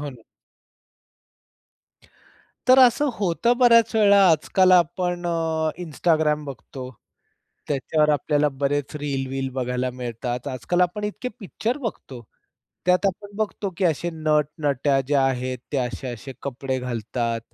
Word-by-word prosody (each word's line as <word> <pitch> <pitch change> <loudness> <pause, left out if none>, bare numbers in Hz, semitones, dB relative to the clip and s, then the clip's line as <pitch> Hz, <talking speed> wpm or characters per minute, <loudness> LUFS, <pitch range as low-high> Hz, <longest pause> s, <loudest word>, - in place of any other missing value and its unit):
हो 145 -1 -5
ना. 125 -4 -15 2.5
तर 255 - +8
असं 260 +3 +5
होतं 200 +5 +1
बऱ्याच 230 -3 +5
वेळा 200 -2 +5
आजकाल 185 +4 +3
आपण 175 0 +2 0.6
Instagram 155 -2 +1
बघतो, 135 -2 -8 0.8
त्याच्यावर 150 +2 +1
आपल्याला 150 0 +2
बरेच 140 +1 -2
रील-वील 135 -2 -3
बघायला 125 0 -1
मिळतात. 125 0 -5
आजकाल 130 +7 -2
आपण 180 +4 0
इतके 210 +4 -4
पिक्चर 225 +6 -3
बघतो, 205 - -6 0.7
त्यात 180 +2 +3
आपण 200 +2 -4
बघतो 210 -2 -2
की 190 - -1
असे 170 0 0
नट-नट्या 150 -3 +1
ज्या 140 -1 +2
आहेत, 130 -1 -2
ते - - 0
असे-असे 125 0 -5
कपडे 130 -1 -3
घालतात. 115 -1 -3
150 Hz, 115 wpm, -23 LUFS, 130-180 Hz, 2.5 s, तर